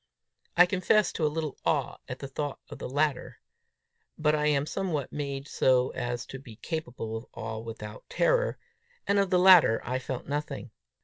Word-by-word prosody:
I 180 - +9
confess 190 +3 +2
to 155 - 0
a - - +1
little 155 -1 -4
awe - - 0
at - - -5
the 140 - -6
thought 145 +1 -4
of - - -9
the - - -5
latter; 145 0 -1 0.8
but 150 -1 +2
I 150 0 +2
am 145 -1 +2
somehow 160 -4 -2
made 140 -1 -4
so 130 -2 +3
as 120 0 -3
to 135 - -8
be 120 -4 -12
capable 125 -6 -5
of 115 +2 -6
awe 110 0 -5
without 110 -2 -8
terror, - - +2 0.5
and 200 0 +3
of 195 -1 +2
the 180 - +4
latter 180 -10 +7
I 130 +1 -1
felt 130 -1 -5
nothing. 140 -4 -4
145 Hz, 180 wpm, -28 LUFS, 125-160 Hz, 0.8 s, I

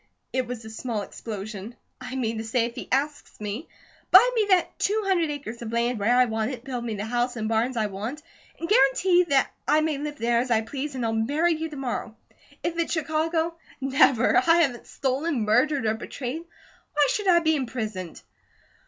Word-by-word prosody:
It 255 -2 0
was 240 -2 -6
a - - -7
small 220 -2 -3
explosion. 210 +1 -7 0.3
"I 255 +1 -6
mean 230 -4 -1
to - - -3
say 230 +1 +1
if 235 - -5
he - - -7
asks 290 +3 -1
me, 210 +8 -5 0.4
'buy 425 +7 +8
me 440 -4 +1
that 370 -2 +2
two 425 +2 +1
hundred 350 -5 +2
acres 275 -6 -6
of 230 -1 -5
land 235 0 0
where 225 +5 +3
I 255 - +6
want 220 -1 -1
it, 250 -3 -6
build 250 -3 -4
me 230 -2 -3
the 205 +1 -4
house 245 +2 -1
and 220 -2 -2
barns 230 +3 0
I 220 - +2
want, 215 +9 -5 0.4
and 335 - -3
guarantee 380 -5 +4
that 275 -5 +2 0.2
I 305 +1 +4
may 310 -2 -1
live 295 0 -5
there 235 0 +2
as 250 +1 -1
I 225 -2 +3
please, 275 +5 -5
and 250 -2 -2
I'll 225 - 0
marry 290 +10 +2
you 320 0 -3
to 300 - -9
morrow.' 245 -4 -4 0.5
If 335 0 -2
it's 335 - 0
Chicago 325 +1 0 0.2
Never! 270 -3 +4
I 335 0 +5
haven't 245 -6 -2
stolen, 275 +1 -1
murdered, 255 +5 +2
or 215 - +2
betrayed, 255 +6 -5 0.5
who 290 -2 +4
should 415 -2 -1
I 355 -2 +6
be 315 -1 +3
imprisoned?" 220 - -4
255 Hz, 205 wpm, -25 LUFS, 225-310 Hz, 0.5 s, buy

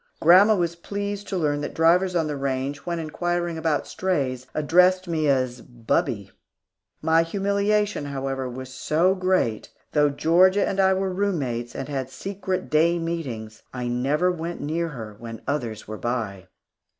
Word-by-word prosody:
Grandma 190 +6 +7
was 170 -3 -1
pleased 200 +3 -4
to 195 - -2
learn 145 -3 0
that 145 - -5
drivers 180 +3 +3
on 165 -2 +2
the 150 -1 -3
range, 135 +2 -3
when 170 -1 -1
inquiring 175 +2 -2
about 160 -2 0
strays, 135 -9 -2
addressed 180 +4 +4
me 160 -3 0
as 130 -3 +1
"Bubbie." 120 - -2 0.7
My 160 0 +4
humiliation, 200 +1 0
however, 135 -2 -3
was 130 +1 -8
so 160 +7 +2
great 185 - 0
that, - - -20 0.2
though 150 -1 +4
Georgia 180 +7 +4
and 195 - -2
I 190 0 +4
were 190 0 -1
room 200 -1 0
mates, 120 -4 -3
and 135 - -4
had 135 -3 -3
secret 185 +5 -4
day 165 +3 +4
meetings, 130 -11 -4
I 125 -1 -3
never 140 +9 +1
went 170 0 -5
near 165 +3 -1
her 110 -9 -8
when 115 -1 -8
others 120 -7 -3
were 110 0 -6
by. 110 -6 -3
160 Hz, 160 wpm, -24 LUFS, 130-180 Hz, 0.7 s, Grandma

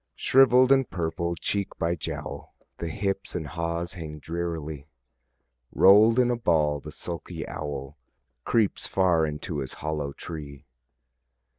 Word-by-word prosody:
Shrivell'd 130 0 +5
and 135 -2 +4
purple, 85 0 -2
cheek 100 +5 -2
by 85 -1 0
jowl, 85 - -6 0.2
The 85 - -3
hips 95 +3 -2
and 85 -3 -2
haws 85 +2 -3
hang 80 -4 -7
drearily; 80 -2 -5 0.8
Roll'd 105 +4 +6
in 125 -1 +4
a - - +1
ball 80 -9 +2
the 75 +2 -9
sulky 85 +2 -6
owl 70 0 -6 0.4
Creeps 110 -4 +1
far 85 -4 +2
into 75 +1 -4
his 65 -2 -2
hollow 75 -2 -3
tree. 75 -2 -8
85 Hz, 130 wpm, -26 LUFS, 75-95 Hz, 0.8 s, Roll'd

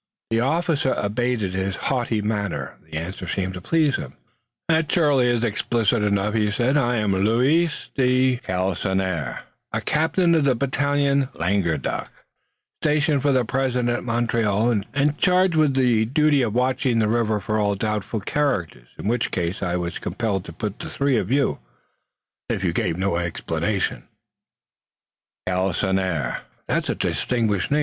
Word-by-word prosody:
The 115 - +2
officer 155 +1 +1
abated 110 -1 -1
his 95 0 -1
haughty 120 -5 -1
manner. 105 -2 -2 0.2
The - - -4
answer 90 +3 -5
seemed 95 +1 -2
to 90 - -7
please 155 - +2
him. - - -7 0.5
"That 160 -1 +2
surely 145 -7 +3
is 120 -1 +1
explicit 115 0 +1
enough," 105 0 +1
he 105 -2 +2
said. 120 +6 +1
"I 125 -4 +2
am 105 -3 +1
Louis 125 - +3 0.2
de 130 -1 +3
Galisonnière, 95 - -2 0.3
a - - -1
captain 170 +3 +2
of 160 -3 +3
the 135 -2 +3
battalion 140 +1 +1
Languedoc, 85 -5 -1 0.7
stationed 150 -1 +2
for 145 - +2
the 130 -2 +2
present 125 -1 0
at 120 +1 -1
Montreal 115 -2 +1
and 145 +2 +1
charged 180 0 +3
with 150 -4 +3
the 120 -4 +3
duty 145 +3 +3
of 115 -3 -1
watching 125 -1 +1
the 110 -2 +2
river 110 -1 +1
for 110 +2 -1
all 100 -1 +1
doubtful 105 +1 -2
characters, 90 - -1
in - - -5
which 120 +1 +1
class 90 +1 -2
I 90 -2 -1
was 85 0 -3
compelled 100 -5 -2
to - - -8
put 105 -2 -5
the - - -6
three 140 -2 +1
of 95 - -1
you, 140 +2 +1 0.9
if 95 - -1
you 85 -3 +1
gave 85 -5 -1
no 95 -2 0
explanations." 85 -1 -2 1.4
"Galisonnière! 95 -5 0 0.3
That - - 0
is - - -5
a - - 0
distinguished 110 -6 0
name. 150 - +2
115 Hz, 155 wpm, -23 LUFS, 95-135 Hz, 1.4 s, surely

